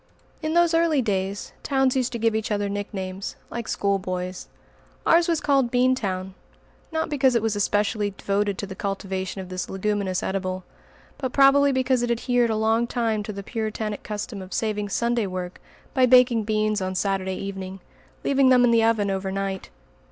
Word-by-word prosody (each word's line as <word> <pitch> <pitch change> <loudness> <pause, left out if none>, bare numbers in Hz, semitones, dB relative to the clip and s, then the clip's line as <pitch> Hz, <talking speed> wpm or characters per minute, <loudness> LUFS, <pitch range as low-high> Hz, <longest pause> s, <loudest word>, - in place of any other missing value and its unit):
In 310 +1 -1
those 345 -1 +4
early 330 -5 +3
days, 195 -2 -2
towns 270 -2 +1
used 255 -2 +1
to - - -2
give 225 -1 +1
each 220 0 -1
other 205 -1 0
nicknames, 195 -1 -4 0.2
like 235 -1 -4
schoolboys. 185 -2 -2 0.6
Ours 335 +1 +5
was 335 -2 +1
called 275 -5 +2
"Bean 250 +1 +3
town" 190 -5 -3 0.6
not 320 0 -1
because 270 -4 +2
it 235 - +3
was 220 -2 0
especially 205 +1 +1
devoted 200 0 -1
to - - -3
the 190 - -7
cultivation 190 -1 -3
of 185 - -9
this 185 0 -4
leguminous 195 -1 -1
edible, 185 -1 -2 0.6
but 260 -3 -3
probably 280 +1 +6
because 260 -1 +1
it 240 - -1
adhered 240 0 +1
a 220 - +1
long 220 +2 +2
time 225 -3 0
to 210 - -5
the 200 -1 -7
Puritanic 215 -1 -3
custom 210 -1 -5
of 185 0 -7
saving 210 -2 -1
Sunday 235 0 0
work 180 -1 -6 0.3
by 255 -1 +4
baking 245 -3 +5
beans 215 -1 +1
on 185 0 -2
Saturday 190 -1 -1
evening, 190 -1 -6 0.4
leaving 275 -1 +4
them 250 -1 +6
in 245 - +5
the 230 -1 +4
oven 220 -3 +2
over 190 0 -2
night. 195 0 -3
215 Hz, 180 wpm, -24 LUFS, 195-245 Hz, 0.6 s, probably